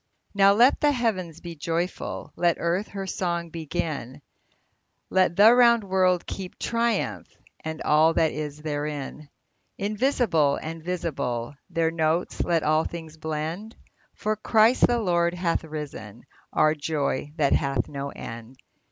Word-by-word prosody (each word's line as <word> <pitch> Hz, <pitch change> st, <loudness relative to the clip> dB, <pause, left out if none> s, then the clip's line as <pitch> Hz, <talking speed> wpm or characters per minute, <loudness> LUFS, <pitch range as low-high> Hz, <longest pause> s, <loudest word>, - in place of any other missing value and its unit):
Now 200 Hz, 0 st, +6 dB
let 240 Hz, +6 st, +4 dB
the 295 Hz, -1 st, +4 dB
heavens 185 Hz, -, -2 dB
be 170 Hz, -1 st, -7 dB
joyful, 165 Hz, +4 st, -3 dB
Let 175 Hz, -1 st, +2 dB
earth 175 Hz, +5 st, 0 dB
her 195 Hz, -1 st, -6 dB
song 170 Hz, -2 st, -2 dB
begin, 155 Hz, -4 st, -4 dB, 0.9 s
Let 185 Hz, -2 st, +3 dB
the 210 Hz, +5 st, +8 dB
round 235 Hz, -2 st, +5 dB
world 185 Hz, -2 st, +2 dB
keep 185 Hz, -2 st, -7 dB
triumph, 235 Hz, 0 st, -1 dB, 0.4 s
And 160 Hz, 0 st, -5 dB
all 155 Hz, +2 st, +4 dB
that 160 Hz, -1 st, +3 dB
is 150 Hz, 0 st, -6 dB
therein! 150 Hz, -1 st, -4 dB, 0.5 s
Invisible 205 Hz, -, +1 dB
and 160 Hz, 0 st, -6 dB
visible, 140 Hz, -9 st, -3 dB, 0.2 s
Their 165 Hz, -1 st, +1 dB
notes 160 Hz, +1 st, 0 dB
let 170 Hz, -2 st, +1 dB
all 155 Hz, +1 st, +3 dB
things 160 Hz, -2 st, -8 dB
blend, 160 Hz, +7 st, -4 dB, 0.4 s
For 215 Hz, 0 st, -1 dB
Christ 220 Hz, +3 st, +4 dB
the 240 Hz, -, +1 dB
Lord 170 Hz, -4 st, +1 dB
hath 175 Hz, -2 st, 0 dB
risen, 145 Hz, -8 st, -7 dB, 0.3 s
Our 155 Hz, 0 st, +3 dB
joy 145 Hz, -2 st, -2 dB
that 145 Hz, -3 st, +3 dB
hath 135 Hz, -3 st, 0 dB
no 140 Hz, -1 st, -5 dB
end 115 Hz, 0 st, -9 dB
165 Hz, 135 wpm, -25 LUFS, 150-190 Hz, 0.9 s, the